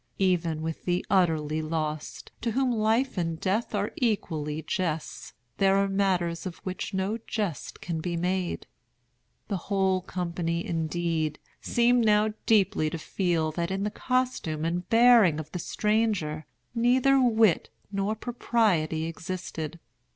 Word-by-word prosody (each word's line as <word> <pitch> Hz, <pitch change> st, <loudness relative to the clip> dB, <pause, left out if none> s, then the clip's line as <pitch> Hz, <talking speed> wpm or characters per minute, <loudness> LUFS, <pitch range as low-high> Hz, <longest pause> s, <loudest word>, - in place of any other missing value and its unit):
Even 170 Hz, -4 st, +1 dB
with 160 Hz, 0 st, -5 dB
the 175 Hz, 0 st, 0 dB
utterly 160 Hz, -5 st, +2 dB
lost, 155 Hz, -1 st, -4 dB
to 230 Hz, -1 st, -1 dB
whom 260 Hz, +1 st, +2 dB
life 225 Hz, +1 st, +1 dB
and 165 Hz, -2 st, -2 dB
death 205 Hz, +5 st, -1 dB
are 205 Hz, +1 st, -1 dB
equally 160 Hz, -, -1 dB
jests, 165 Hz, -4 st, -3 dB, 0.2 s
there 195 Hz, 0 st, +4 dB
are 195 Hz, 0 st, +3 dB
matters 185 Hz, -3 st, 0 dB
of 175 Hz, -, -7 dB
which 185 Hz, 0 st, -4 dB
no 195 Hz, +4 st, -1 dB
jest 205 Hz, -9 st, -3 dB
can 165 Hz, -2 st, -3 dB
be 175 Hz, 0 st, -2 dB
made. 180 Hz, +1 st, -1 dB, 0.8 s
The 200 Hz, -, -1 dB
whole 190 Hz, -2 st, +2 dB
company, 170 Hz, -1 st, -3 dB
indeed, 165 Hz, -1 st, -1 dB, 0.2 s
seemed 240 Hz, 0 st, +3 dB
now 215 Hz, 0 st, +3 dB
deeply 195 Hz, -7 st, +3 dB
to 165 Hz, -, -4 dB
feel 165 Hz, -1 st, 0 dB
that 170 Hz, +2 st, -2 dB
in 190 Hz, +1 st, -2 dB
the 210 Hz, -, -1 dB
costume 250 Hz, -13 st, -1 dB
and 175 Hz, +2 st, -2 dB
bearing 230 Hz, -9 st, +6 dB
of 155 Hz, 0 st, -7 dB
the 180 Hz, -, -4 dB
stranger 205 Hz, -, 0 dB, 0.3 s
neither 260 Hz, +3 st, +4 dB
wit 220 Hz, -7 st, +3 dB, 0.2 s
nor 200 Hz, +2 st, -1 dB
propriety 210 Hz, -10 st, 0 dB
existed. 165 Hz, -1 st, -5 dB
185 Hz, 135 wpm, -27 LUFS, 165-215 Hz, 0.8 s, bearing